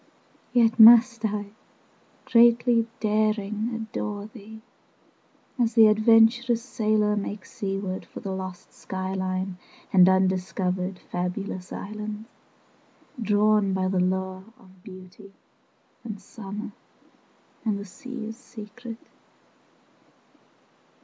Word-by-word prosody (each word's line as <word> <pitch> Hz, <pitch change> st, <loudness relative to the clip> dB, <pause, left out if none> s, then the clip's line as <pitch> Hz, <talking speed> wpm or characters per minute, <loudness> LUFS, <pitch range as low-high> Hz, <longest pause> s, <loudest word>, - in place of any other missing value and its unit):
20 245 Hz, -, +4 dB
Yet 225 Hz, -, -18 dB
must 230 Hz, 0 st, +8 dB
I, 205 Hz, -1 st, -3 dB, 0.7 s
greatly 235 Hz, -1 st, +4 dB
Daring, 215 Hz, +1 st, 0 dB
adore 215 Hz, -2 st, -5 dB
thee, 220 Hz, 0 st, -13 dB, 1.0 s
As 235 Hz, -1 st, +1 dB
the 225 Hz, -2 st, +8 dB
adventurous 225 Hz, +2 st, +4 dB
Sailor 215 Hz, -4 st, +1 dB
makes 205 Hz, -1 st, -5 dB
seaward 195 Hz, -1 st, -4 dB
For -, -, -9 dB
the 195 Hz, -4 st, -5 dB
lost 185 Hz, -1 st, -7 dB
sky 190 Hz, 0 st, -5 dB
line 185 Hz, -1 st, -3 dB, 0.3 s
25 -, -, -26 dB
And 185 Hz, -1 st, +7 dB
undiscovered 185 Hz, 0 st, 0 dB
Fabulous 180 Hz, +1 st, -4 dB
islands, 210 Hz, +1 st, -6 dB, 0.9 s
Drawn 210 Hz, -1 st, +2 dB
by 185 Hz, 0 st, 0 dB
the 185 Hz, -1 st, 0 dB
lure 190 Hz, +1 st, -1 dB
of 190 Hz, -6 st, -20 dB
Beauty 185 Hz, 0 st, -13 dB, 0.7 s
and 215 Hz, -4 st, -7 dB
summer 205 Hz, +1 st, -8 dB, 0.9 s
And 215 Hz, -3 st, 0 dB
the 200 Hz, -, -7 dB
sea's 225 Hz, +2 st, -8 dB
secret. 230 Hz, 0 st, -10 dB
210 Hz, 105 wpm, -25 LUFS, 190-225 Hz, 1.0 s, must